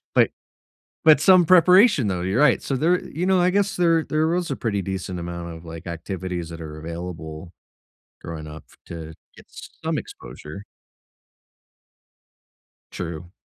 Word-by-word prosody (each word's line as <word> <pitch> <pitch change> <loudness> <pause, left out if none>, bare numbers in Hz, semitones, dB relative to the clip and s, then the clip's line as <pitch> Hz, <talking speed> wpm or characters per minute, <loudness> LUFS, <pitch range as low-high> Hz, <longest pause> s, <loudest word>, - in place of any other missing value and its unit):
Like - - +4 0.7
but 155 -3 +7
some 185 0 +6
preparation 180 - +6
though, 90 -2 -2
you're 95 +8 0
right. 150 -4 +4
So, 135 - -2
there 175 +6 +2
you 175 +4 -4
know, 190 -1 +3
I 180 +1 +3
guess 200 +1 0
there 165 -2 +3
there 155 +1 0
was 175 -1 -1
a 135 - -2
pretty 100 -4 -2
decent 95 -2 -4
amount 85 -1 -6
of 80 +1 -12
like, 80 +1 -9
activities 85 0 -5
that 85 0 -9
are 80 -1 -8
available 85 0 -7 0.7
growing 80 -2 -7
up 75 +1 -10 0.2
to 80 -1 -8 0.2
get - - -16
some - - -6
exposure. 85 +7 -9 2.3
True. 85 0 -6
95 Hz, 145 wpm, -23 LUFS, -, 2.3 s, but